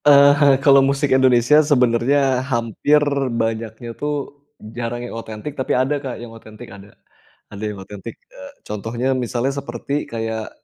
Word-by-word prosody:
Eee, 140 -1 +7
eh, 145 -2 +4
kalau 140 -1 +7
musik 140 +1 +1
Indonesia 130 +2 +5
sebenarnya 130 -1 +2
hampir 120 +4 +1 0.4
banyaknya 115 +1 -4
tuh 150 +5 -3 0.6
jarang 120 0 -4
yang - - -8
otentik, 115 +4 -7
tapi 130 -3 -1
ada 135 +3 0
Kak 130 -4 -5
yang 115 -1 -10
otentik 115 +1 -12
ada. 100 +1 -15 0.6
Ada 100 +1 -8
yang 105 -2 -7
otentik, 105 +3 -9 0.2
e - - -14 0.3
contohnya 115 +5 -2
misalnya 125 +1 -1
seperti 140 +3 -4
kayak 110 -1 -4
120 Hz, 145 wpm, -20 LUFS, 115-140 Hz, 0.6 s, Eee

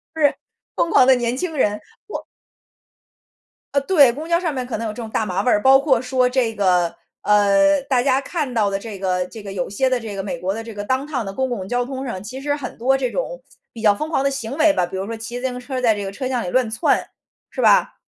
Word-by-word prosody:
是。 295 -3 +3 0.4
疯 335 - +1
狂 255 - +6
的 265 - +7
年 240 0 -1
轻 320 +2 -3
人。 210 -5 +2 0.3
我 420 - -6 1.5
呃， 280 - +5
对， 285 -5 +5
公 300 +6 -7
交 340 0 +3
上 335 -4 -2
面 255 -2 -4
可 250 - -3
能 230 - -4
有 - - -3
这 - - -14
种 225 - -6
大 220 - -1
麻 190 -1 -1
味 - - +1
儿， 210 - +3
包 265 +2 +7
括 270 -4 +2
说 255 -1 +1
这 250 -3 0
个 180 -4 +2 0.3
呃， 210 +8 +4
大 255 -3 +1
家 265 -1 +3
看 290 -2 -3
到 215 -3 +2
的 195 - -1
这 205 -1 -8
个 180 -1 0
这 225 - -10
个 200 -1 -7
有 180 -3 -3
些 260 +7 +1
的 255 - +1
这 225 -3 -6
个 195 - -3
美 190 -3 -4
国 185 +3 -2
的 225 - -5
这 225 0 -9
个 205 0 -6
downtown 260 +1 -1
的 195 - -5
公 265 +2 -1
共 205 -7 -3
交 245 +3 0
通 265 +1 -5
上， 190 -8 -5
其 255 +6 -8
实 290 +1 0
很 285 -3 -6
多 265 +3 +2
这 255 -2 -1
种 - - -4 0.3
比 230 - -10
较 210 -2 +4
疯 305 +8 -4
狂 290 - +1
的 - - +4
行 270 0 -5
为 315 -1 +5
吧， 180 - +1
比 185 +2 -6
如 190 - -3
说 230 +2 -5
骑 235 +2 -6
自 260 - -5
行 250 -1 -5
车 255 +1 -4
在 225 -4 +3
这 205 - -4
个 195 - -4
车 255 +6 -4
厢 250 -2 -1
里 180 - -4
乱 255 +2 +1
窜， 220 - +1 0.4
是 - - -4
吧？ - - +4
245 Hz, 310 characters per minute, -21 LUFS, 205-270 Hz, 1.5 s, 的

